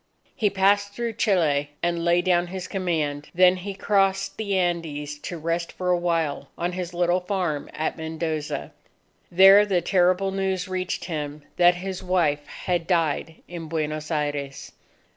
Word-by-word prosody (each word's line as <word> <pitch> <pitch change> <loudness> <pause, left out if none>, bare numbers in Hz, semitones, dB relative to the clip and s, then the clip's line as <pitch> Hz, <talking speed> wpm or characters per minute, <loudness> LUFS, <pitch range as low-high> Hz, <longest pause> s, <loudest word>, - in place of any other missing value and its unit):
He 220 -6 +2
passed 200 +1 +2
through 235 +1 -3
Chile 160 -10 +1
and 170 -1 0
laid 175 +1 +2
down 175 -1 +2
his 185 0 -6
command; 155 -6 -2
then 185 +1 +5
he 195 +2 -6
crossed 195 -1 +1
the 200 -3 -1
Andes 155 -5 -2
to 175 - -6
rest 165 +1 -2
for 180 -1 -3
a 180 - +3
while 165 -4 -1
on 175 +1 -1
his 180 -1 -4
little 175 +1 +2
farm 180 -6 -2
at 155 - -3
Mendoza. 160 -1 -3 0.6
There 195 +3 +8
the 195 -4 +1
terrible 185 +2 +2
news 190 -1 -1
reached 185 -1 -3
him 150 -3 -5
that 175 0 +6
his 185 +1 -5
wife 160 -6 0
had 175 -2 -3
died 165 -2 0
in 170 -2 -7
Buenos 155 -1 -3
Aires. 145 -3 -3
175 Hz, 155 wpm, -24 LUFS, 160-190 Hz, 0.6 s, There